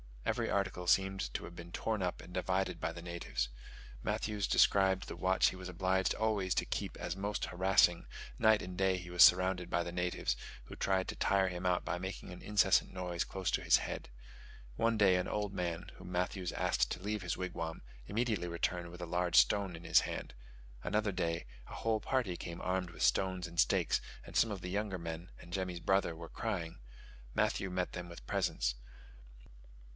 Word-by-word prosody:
Every - - 0
article 95 -3 -1
seemed 95 -7 +2
to - - -2
have 85 - -9
been 85 0 -9
torn 110 +2 -1
up 90 -1 -2
and 90 - -12
divided 95 +1 0
by - - -1
the 85 - -8
natives. 85 -8 -3 0.5
Matthews 105 - -1
described 95 -1 +4
the - - -6
watch 95 +1 +3
he - - -7
was 95 0 -7
obliged 95 +1 +1
always 105 -4 +1
to - - +1
keep - - -3
as - - -3
most 100 +2 -2
harassing; 90 -1 +3 0.3
night 110 -1 +5
and 90 0 -6
day 95 -1 +2
he 90 -1 -8
was 90 -1 +8
surrounded 90 -1 +5
by 85 - +1
the 85 - -5
natives, 90 0 -1 0.3
who - - -9
tried 95 -1 +1
to - - -3
tire 95 -1 +2
him 90 0 -5
out 90 -1 +2
by 90 +2 -2
making 95 0 -6
an 90 - -9
incessant 105 -2 +3
noise 90 -2 -2
close 95 -1 -2
to - - +1
his - - +5
head. - - -5 0.7
One 115 - +2
day 95 -3 +5
an 90 - -1
old 105 -1 -2
man, 85 0 -3
whom - - -10
Matthews 90 0 -1
asked - - +1
to 90 - -4
leave 105 0 -2
his 90 -3 -2
wigwam, 85 -3 -4 0.3
immediately 110 -5 0
returned 85 0 -2
with 90 +1 -10
a - - -3
large 90 0 0
stone 90 +10 +4
in 80 - -10
his - - +5
hand: - - -5 0.5
another 105 -1 +1
day 85 -3 -1 0.2
a - - -9
whole 110 -1 0
party 105 -6 -1
came 85 0 -6
armed 90 -1 -1
with 80 - -4
stones 95 -1 +2
and 85 0 -7
stakes, - - +3 0.2
and - - -11
some 115 - +4
of 100 -3 -4
the 90 - -5
younger 100 -1 -1
men 85 +1 -6
and 85 - -12
Jemmy's 90 -2 -2
brother 95 -3 +2
were 85 0 -9
crying: 80 -4 -3 0.6
Matthews 95 -1 +1
met 90 0 -1
them 90 -1 -6
with 85 - -11
presents. - - 0
90 Hz, 195 wpm, -34 LUFS, 85-95 Hz, 0.7 s, was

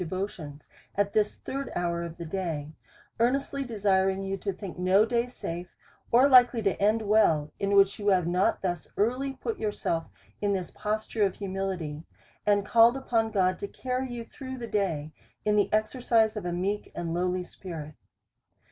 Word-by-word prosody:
209 185 +3 -2 0.3
devotions^ 150 - -22 0.3
at 200 0 +1
this 210 -1 +2
third 275 +1 -5
hour 170 -1 -1
of 170 -1 -6
the 170 - -6
day: 160 -4 -3 0.5
earnestly 275 +3 +1
de 240 -4 -7
siring 195 -1 +2
you 195 - -1
to 195 +1 -3
think 185 -1 -8
no 190 +4 +4
day 235 +1 0
safe, 175 -7 -6 0.4
or 250 +4 +6
likely 245 -3 +6
to 195 -2 +2
end 215 +2 +3
well, 200 -8 +3
in 200 0 +1
which 195 +1 +5
you 205 - -3
have 185 -4 +4
not 180 +3 +1
thus 175 -3 -2
early 255 +6 0
put 430 - -4
youi'self 170 -6 -1 0.3
in 205 -1 +1
this 185 -2 -3
posture 215 +1 -2
ot 195 - +1
humility, 190 -6 -3 0.5
and 205 -1 +3
called 230 +3 +5
upon 230 -4 0
God 185 -3 +1
to 200 - -4
carry 255 +4 -3
you 235 -1 -5
through 260 +2 -8
the 240 - -5
day 170 -9 -1 0.3
in 210 0 +3
the 205 - +2
exercise 220 0 +2
of 210 -4 -4
a - - -1
meek 195 +4 -2
and 170 -1 -3
lowly 180 +1 0
spirit. 165 -5 -8
200 Hz, 180 wpm, -28 LUFS, 180-225 Hz, 0.5 s, or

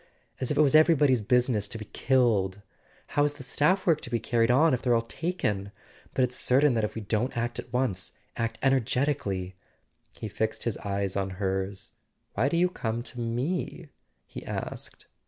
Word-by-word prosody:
As 130 - -2
if - - -1
it - - +6
was 140 -3 +4
everybody's 150 -6 +5
business 120 -1 +2
to 110 - -5
be 110 - -7
killed! 105 -8 +1 0.5
How's 145 0 +2
the 145 -2 -11
staff 185 +9 +2
work 165 -4 +3
to - - -6
be 120 -1 0
carried 115 +1 +1
on 145 +5 +5
if 125 - 0
they're 120 -2 +3
all 115 - +3
taken? 115 - -2 0.4
But 130 - +3
it's 125 0 0
certain 135 +2 +4
that 115 -2 0
if 105 0 -2
we 110 - -4
don't 110 +5 -1
act 120 +1 -2
at 120 - -8
once... 125 -8 -1 0.2
act 115 -1 -2
energetically.. 125 -8 0 0.6
He 110 - -5
fixed 110 +2 -2
his 115 - -1
eyes 100 -1 -2
on 100 -1 -1
hers. 95 0 -2 0.4
"Why 120 +7 +1
do 170 - 0
you 180 +1 +4
come 115 -8 -3
to 125 - -8
me?" 140 +8 -2 0.4
he - - -9
asked. - - -6
120 Hz, 185 wpm, -28 LUFS, 105-135 Hz, 0.6 s, it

